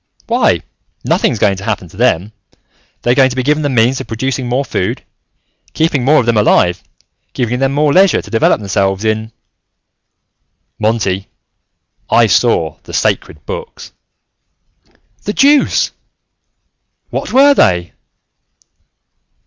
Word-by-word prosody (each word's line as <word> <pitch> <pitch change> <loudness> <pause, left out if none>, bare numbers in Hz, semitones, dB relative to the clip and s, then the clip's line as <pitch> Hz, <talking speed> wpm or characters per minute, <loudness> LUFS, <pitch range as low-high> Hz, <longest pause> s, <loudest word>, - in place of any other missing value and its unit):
"Why, - - +1 0.4
nothing's - - +1
going 100 -2 +1
to 95 - -8
happen 100 -4 -3
to - - -17
them. 105 -3 0 0.7
They're 120 - +2
going 130 0 +4
to 125 - -6
be 130 - -1
given 150 +3 +1
the 145 - -1
means 125 +1 +1
of - - -9
producing 125 +2 -3
more 130 +3 0
food, 90 - -3 0.7
keeping 155 -5 0
more 150 +4 +4
of 120 - 0
them 115 -1 +1
alive, 90 -4 +2 0.5
giving 125 0 -2
them 135 0 +1
more 145 +1 +1
leisure 190 0 +4
to - - -10
develop 115 -2 +2
themselves 95 0 -1
in 110 +1 -1 0.7
" - - -54
"Monty, 105 -3 -1 0.8
I 120 - +4
saw 95 - +1
the - - -13
Sacred 75 - -2
Books." - - -8 1.3
"The 205 - -2
deuce! 285 +3 +3 1.2
What - - -4
were 280 +2 +6
they?" 90 - +1
115 Hz, 135 wpm, -14 LUFS, 100-135 Hz, 1.3 s, were